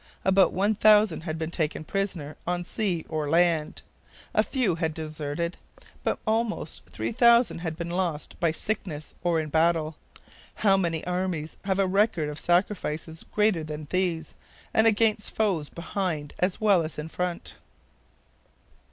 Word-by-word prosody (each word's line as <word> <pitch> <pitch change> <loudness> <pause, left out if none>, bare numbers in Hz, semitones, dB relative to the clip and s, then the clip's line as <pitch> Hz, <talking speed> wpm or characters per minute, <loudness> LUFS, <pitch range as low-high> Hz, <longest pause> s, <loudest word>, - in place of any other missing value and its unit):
About 190 -2 +5
1,000 210 -2 +4
had 160 -2 -3
been 160 +1 -3
taken 155 -2 -2
prisoner 170 -5 -3
on 175 0 0
sea 175 -3 -1
or 155 -2 -2
land. 165 -1 +2 0.5
A - - +4
few 250 -9 0
had 160 -1 -2
deserted. 155 +2 -3 0.5
But - - 0
almost 220 0 -1
3,000 235 -3 +3
had 160 -2 -4
been 170 0 -4
lost 175 -4 -2
by 170 - +3
sickness 160 -3 -3
or 170 -2 +2
in 155 -1 -3
battle. 160 0 +2 0.6
How 195 -2 +4
many 170 -4 -1
armies 180 -3 -2
have 190 -1 +1
a 195 - +3
record 185 -5 +2
of 150 +1 -6
sacrifices 175 -3 -1
greater 210 -6 +2
than 150 0 -6
these, 175 -4 0 0.4
and 220 +1 +5
against 220 -1 +2
foes 185 -9 0
behind 170 -4 -3
as 180 +1 0
well 205 -5 +4
as 155 0 -5
in 150 +1 -4
front? 180 +1 -4
175 Hz, 145 wpm, -26 LUFS, 160-195 Hz, 0.6 s, About